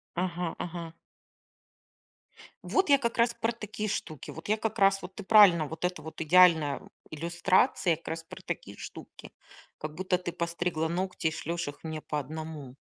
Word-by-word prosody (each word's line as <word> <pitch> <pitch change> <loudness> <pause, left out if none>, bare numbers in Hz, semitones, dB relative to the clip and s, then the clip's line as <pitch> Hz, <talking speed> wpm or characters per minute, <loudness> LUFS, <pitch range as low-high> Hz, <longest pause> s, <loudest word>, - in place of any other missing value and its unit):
Ага 175 -1 -2
ага. 170 -1 -5 1.7
Вот 385 -5 +1
я 280 - +7
как 235 -4 -2
раз 235 0 +3
про 230 0 -1
такие 215 -1 -5
штуки. 155 -7 -4
Вот 160 - -9
я 215 - +3
как 220 +1 -3
раз, 195 0 +4
вот 180 +1 -9
ты 205 - -7
правильно, 190 -6 +7
вот 160 +4 -4
это 180 0 -2
вот 160 +1 -9
идеальная, 160 -3 +5
м, - - -16 0.2
иллюстрация 175 - +2
как 165 - -18
раз 165 0 -4
про 165 - -11
такие - - -5
штуки. - - -10 0.5
Как 155 0 -6
будто 185 0 0
ты 180 -1 -5
постригла 170 -1 -1
ногти 180 -1 -1
и - - +1
шлешь 165 +1 -3
их 145 - -10
мне 160 -1 -5
по 150 - -2
одному. 150 -2 -7
175 Hz, 175 wpm, -29 LUFS, 160-195 Hz, 1.7 s, я